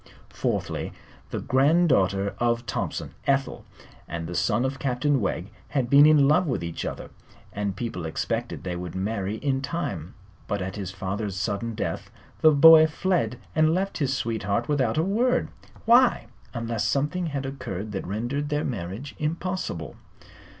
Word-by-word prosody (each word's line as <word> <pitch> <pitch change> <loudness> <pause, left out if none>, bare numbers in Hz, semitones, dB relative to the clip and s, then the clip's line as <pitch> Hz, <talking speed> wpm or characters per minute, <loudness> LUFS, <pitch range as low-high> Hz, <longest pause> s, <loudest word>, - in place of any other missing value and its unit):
Fourthly, - - -2 0.4
the - - -3
granddaughter 130 - +3
of 120 0 +1
Thompson, - - -3
Ethel, 135 -1 0 0.4
and 85 0 -4
the 85 - -6
son 120 +7 +1
of 135 +1 -3
Captain 135 +1 +1
Wegg 95 0 -2 0.2
had 130 -4 -1
been 145 +2 +8
in 150 -3 +6
love 160 +5 +3
with 125 - -1
each 85 -1 -4
other, - - -6 0.4
and 100 -2 -2
people 95 -7 -4
expected 80 - -3
they 90 -1 -3
would 90 -1 -6
marry 100 +1 -2
in 135 +3 -1
time. 100 - -4 0.3
But 100 -1 -1
at 95 0 -4
his 100 -3 -4
father's 100 +1 -4
sudden 105 +3 -2
death - - -3 0.3
the 155 - +8
boy 160 +2 +8
fled 175 -4 0 0.2
and 155 +1 +4
left 195 +2 -2
his 140 -3 +1
sweetheart 110 -4 -1
without 135 -6 +1
a 160 - +3
word. 235 +7 +1 0.4
Why 240 - +5 0.3
unless 115 -2 -2
something 150 +8 0
had 140 -3 -3
occurred 110 -7 -5
that 95 - -4
rendered 120 +9 -2
their 150 0 0
marriage 110 +3 -5
impossible? 155 - -3
125 Hz, 155 wpm, -25 LUFS, 100-150 Hz, 0.4 s, been